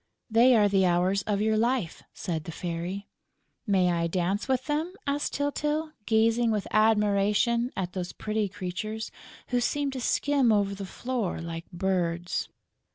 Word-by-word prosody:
"They 240 +3 +6
are 210 -2 +5
the 195 -1 +3
Hours 180 +3 +2
of 205 -1 +1
your 220 0 +2
life," 230 -5 0
said 160 -3 -4
the 165 - -5
Fairy. 175 +4 -4 0.6
"May 185 -3 +3
I 170 -1 +1
dance 185 +6 -1
with 260 -1 0
them?" 310 +3 -1
asked 285 +1 -1
Tyltyl, 300 +2 -1 0.2
gazing 225 +1 +3
with 210 -2 0
admiration 215 +2 +3
at 180 -2 -2
those 180 -2 -4
pretty 215 -1 -2
creatures, 205 +4 -5 0.4
who 245 -1 +1
seemed 285 +2 0
to 260 - -4
skim 275 -1 +2
over 200 -2 +2
the 195 -1 -6
floor 240 -3 -3
like 165 0 -6
birds. 175 -1 -1
210 Hz, 155 wpm, -27 LUFS, 185-240 Hz, 0.6 s, They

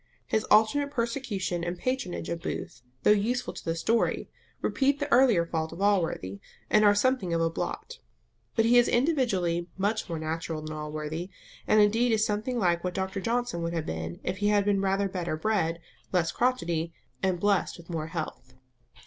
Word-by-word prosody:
His 220 - 0
alternate 225 +7 +4
persecution 230 -9 -2
and 175 +1 -3
patronage 255 -7 -2
of 170 0 -3
Booth, - - -5 0.2
though - - +6
useful 230 +5 +1
to - - -9
the 165 - -1
story, 225 +8 0 0.3
repeat 280 +1 +1
the 290 - -1
earlier 240 -9 +5
fault 160 -1 -2
of 165 - -9
Allworthy, 170 - 0 0.3
and 215 - +5
are 205 -1 +6
something 205 -6 +1
of 165 - +1
a 165 0 +1
blot. - - -5 0.6
But 225 - +3
he 245 +1 +6
is 240 - +4
individually 200 - +1
much 205 +1 -1
more 165 - -2
natural 160 0 -3
than 155 0 -5
Allworthy, 155 +3 -4 0.4
and 215 - +5
indeed 225 +4 +3
is 220 -1 +3
something 215 +4 -1
like 175 -5 +1
what 180 -1 -3
Dr 190 +1 -2
Johnson 235 -4 -1
would 170 0 -2
have 165 -2 -2
been 80 +1 -5
if 185 - -2
he 205 +1 0
had 205 -1 +3
been 200 -1 +2
rather 195 +1 +1
better 180 -4 -3
bred, 170 -3 0 0.3
less 175 -3 +1
crotchety, 170 -10 0 0.3
and 185 -2 +1
blessed 200 0 +1
with 170 0 -11
more 160 -2 -3
health. 155 -6 -6
190 Hz, 185 wpm, -28 LUFS, 165-225 Hz, 0.6 s, though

